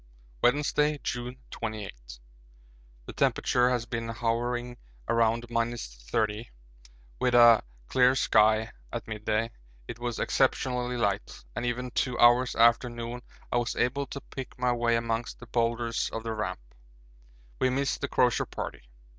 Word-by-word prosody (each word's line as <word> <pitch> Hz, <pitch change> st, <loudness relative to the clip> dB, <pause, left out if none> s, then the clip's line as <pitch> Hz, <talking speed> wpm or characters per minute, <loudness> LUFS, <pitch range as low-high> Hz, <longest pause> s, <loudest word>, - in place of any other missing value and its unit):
HUXLEY. -, -, -28 dB, 0.2 s
Wednesday, 150 Hz, 0 st, +1 dB
June 125 Hz, +1 st, -4 dB
28. 95 Hz, -, -6 dB, 0.9 s
The -, -, -8 dB
temperature 125 Hz, 0 st, +2 dB
has 120 Hz, -2 st, 0 dB
been 115 Hz, -1 st, -4 dB
hovering 120 Hz, +1 st, -2 dB, 0.3 s
around 115 Hz, 0 st, +2 dB
30° 115 Hz, -, -2 dB, 0.7 s
with 125 Hz, -1 st, +2 dB
a 120 Hz, -2 st, +8 dB, 0.3 s
clear 130 Hz, -, +4 dB
sky 110 Hz, -2 st, +3 dB, 0.2 s
at -, -, -5 dB
midday 110 Hz, +1 st, -1 dB, 0.4 s
it 115 Hz, -, -7 dB
was 120 Hz, -2 st, -3 dB
exceptionally 125 Hz, -1 st, 0 dB
light, 100 Hz, -3 st, -2 dB
and 120 Hz, -, -2 dB
even 125 Hz, +1 st, -2 dB
two 125 Hz, 0 st, -1 dB
hours 120 Hz, +1 st, +5 dB
after 120 Hz, +2 st, +4 dB
noon 120 Hz, +1 st, -6 dB, 0.3 s
I -, -, +2 dB
was 120 Hz, -1 st, -1 dB
able 135 Hz, +3 st, 0 dB
to 140 Hz, -, -7 dB
pick 135 Hz, -1 st, -8 dB
my 125 Hz, 0 st, +1 dB
way 120 Hz, -1 st, +2 dB
amongst 115 Hz, 0 st, -2 dB
the 120 Hz, -, -11 dB
boulders 115 Hz, 0 st, 0 dB
of 115 Hz, -, -5 dB
the 115 Hz, -1 st, -3 dB
Ramp. 105 Hz, -, -3 dB, 1.0 s
We 130 Hz, -, +3 dB
miss 135 Hz, +2 st, 0 dB
the 140 Hz, -, -2 dB
Crozier 125 Hz, -4 st, +2 dB
Party. -, -, -6 dB
120 Hz, 140 wpm, -28 LUFS, 115-125 Hz, 1.0 s, a